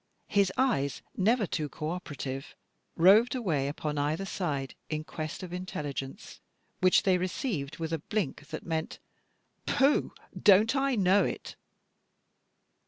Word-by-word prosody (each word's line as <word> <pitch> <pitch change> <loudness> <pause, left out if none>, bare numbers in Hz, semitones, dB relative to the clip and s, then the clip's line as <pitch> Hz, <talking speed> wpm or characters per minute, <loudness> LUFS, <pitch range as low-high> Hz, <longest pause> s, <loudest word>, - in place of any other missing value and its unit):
His 200 -2 +3
eyes, 140 - +1
never 220 +3 +3
too 155 -4 -3
co 155 +2 -4
operative, 140 -6 -5 0.4
roved 205 +9 +6
away 160 - 0
upon 150 0 -3
either 155 +6 0
side, 145 -9 -3 0.2
in 155 0 -2
quest 155 +3 -6
of 180 -1 -7
intelligence, 145 -7 -5 0.4
which 185 0 +4
they 185 -2 +3
received 180 - -3
with 165 0 -3
a 165 - 0
blink 150 -4 -3
that - - -7
meant, 160 -1 -2 0.7
"Pooh, 275 +2 +3 0.3
don't 210 +5 +6
I 270 -1 +2
know 195 -1 +4
it?" - - -4
175 Hz, 130 wpm, -29 LUFS, 150-200 Hz, 0.7 s, roved